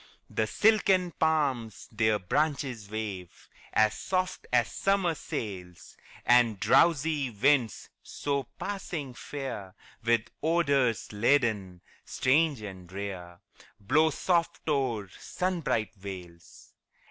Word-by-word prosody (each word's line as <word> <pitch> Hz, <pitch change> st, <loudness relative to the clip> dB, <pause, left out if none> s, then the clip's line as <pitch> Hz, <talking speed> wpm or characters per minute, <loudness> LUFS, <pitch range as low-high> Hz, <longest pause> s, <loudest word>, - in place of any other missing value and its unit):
The 110 Hz, -, 0 dB
silken 195 Hz, -, +3 dB
palms 140 Hz, -10 st, 0 dB
their 110 Hz, -1 st, +2 dB
branches 130 Hz, -, -1 dB
wave 105 Hz, -5 st, -6 dB, 0.2 s
As 110 Hz, -1 st, +3 dB
soft 185 Hz, -, -2 dB
as 120 Hz, -3 st, +2 dB
summer 195 Hz, -3 st, +1 dB
sails; 90 Hz, -, -7 dB, 0.3 s
And 120 Hz, -4 st, +4 dB
drowsy 155 Hz, -, +3 dB
winds, 120 Hz, +1 st, +1 dB
so 140 Hz, -2 st, -3 dB
passing 175 Hz, -9 st, -4 dB
fair, 120 Hz, -8 st, -6 dB, 0.3 s
With 115 Hz, -1 st, +1 dB
odors 140 Hz, -, +1 dB
laden, 105 Hz, -6 st, +1 dB, 0.2 s
strange 140 Hz, -2 st, +1 dB
and 95 Hz, -3 st, -9 dB
rare, 95 Hz, -2 st, -6 dB, 0.4 s
Blow 155 Hz, +11 st, +3 dB
soft 170 Hz, +2 st, 0 dB
o'er 130 Hz, -9 st, 0 dB
sunbright 170 Hz, -, -1 dB
vales. 90 Hz, -4 st, -11 dB
120 Hz, 100 wpm, -29 LUFS, 105-155 Hz, 0.4 s, And